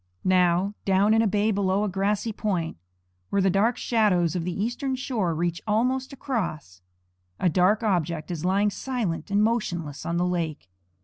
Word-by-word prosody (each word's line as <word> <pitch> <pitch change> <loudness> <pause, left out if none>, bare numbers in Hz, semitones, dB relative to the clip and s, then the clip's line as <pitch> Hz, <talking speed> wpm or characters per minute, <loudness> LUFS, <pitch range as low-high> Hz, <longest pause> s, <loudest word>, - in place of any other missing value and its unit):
Now, 185 +1 +3
down 195 +2 +3
in 225 - +4
a 225 - +2
bay 210 +2 +1
below 200 0 +1
a - - 0
grassy 200 +3 -1
point, 185 -7 -2 0.5
where 200 - +1
the 190 -1 +3
dark 220 +6 +2
shadows 185 -8 +2
of 175 - -1
the 180 +3 -2
eastern 260 +4 -2
shore 225 -10 -1
reach 170 +1 -1
almost 255 +5 +1
across, 180 - -4 0.6
a 180 - +3
dark 185 +6 +3
object 170 -5 -1
is 165 -3 -4
lying 200 +3 +2
silent 215 -6 -3
and 200 +1 +3
motionless 175 -10 -1
on 170 0 -2
the 175 - +1
lake. 165 - -2
195 Hz, 170 wpm, -25 LUFS, 175-220 Hz, 0.6 s, in